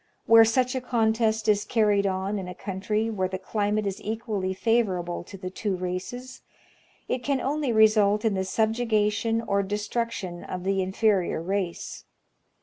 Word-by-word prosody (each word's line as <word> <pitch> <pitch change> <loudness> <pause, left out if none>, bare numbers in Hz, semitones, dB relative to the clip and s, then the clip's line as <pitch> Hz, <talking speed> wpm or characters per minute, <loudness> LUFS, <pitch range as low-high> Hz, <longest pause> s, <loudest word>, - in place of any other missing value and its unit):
Where 225 0 +8
such 250 +3 +1
a 260 - -2
contest 220 -2 +1
is 205 -1 +3
carried 210 -3 +2
on 190 +2 -2
in 185 - -6
a 180 - -7
country 210 +3 -2
where 190 -3 -1
the 190 0 -4
climate 210 +2 -1
is 195 -1 -3
equally 215 -3 -3
favorable 190 -5 0
to 195 - -10
the 185 -1 -6
two 200 0 -2
races, 185 +8 -5 0.7
it 255 - -1
can 275 0 0
only 280 0 -1
result 215 -1 +4
in 220 - +2
the 190 -1 -1
subjugation 220 +1 +1
or 200 -2 +1
destruction 205 -2 -3
of 180 -1 -6
the 195 0 +1
inferior 190 -2 +1
race. 185 0 -4
210 Hz, 155 wpm, -26 LUFS, 190-225 Hz, 0.7 s, Where